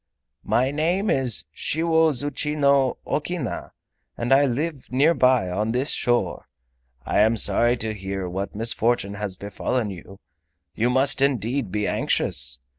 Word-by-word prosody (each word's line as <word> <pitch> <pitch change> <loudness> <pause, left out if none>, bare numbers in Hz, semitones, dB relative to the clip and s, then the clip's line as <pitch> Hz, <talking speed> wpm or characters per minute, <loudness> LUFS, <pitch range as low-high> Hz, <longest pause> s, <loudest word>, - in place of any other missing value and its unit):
"My 125 +5 +1
name 175 +8 0
is 130 -5 +2
Shiwozuchino 145 -3 +1
Okina, 150 -4 -3 0.5
and 120 +3 +1
I 140 +1 +4
live 140 +2 -4
near 145 +6 +3
by 130 - +3
on 105 +5 -1
this 130 +4 0
shore. 120 0 -1 0.6
I - - 0
am 110 +2 +3
sorry 120 +4 +3
to 110 -1 -3
hear 95 -2 -5
what 95 +3 -5
misfortune 115 -2 +1
has 100 -2 -4
befallen 105 +3 -3
you. 95 +1 -12 0.5
You 115 +2 0
must 130 +2 +3
indeed 130 -4 0
be 105 0 -1
anxious. 65 0 +1
125 Hz, 130 wpm, -23 LUFS, 105-140 Hz, 0.6 s, I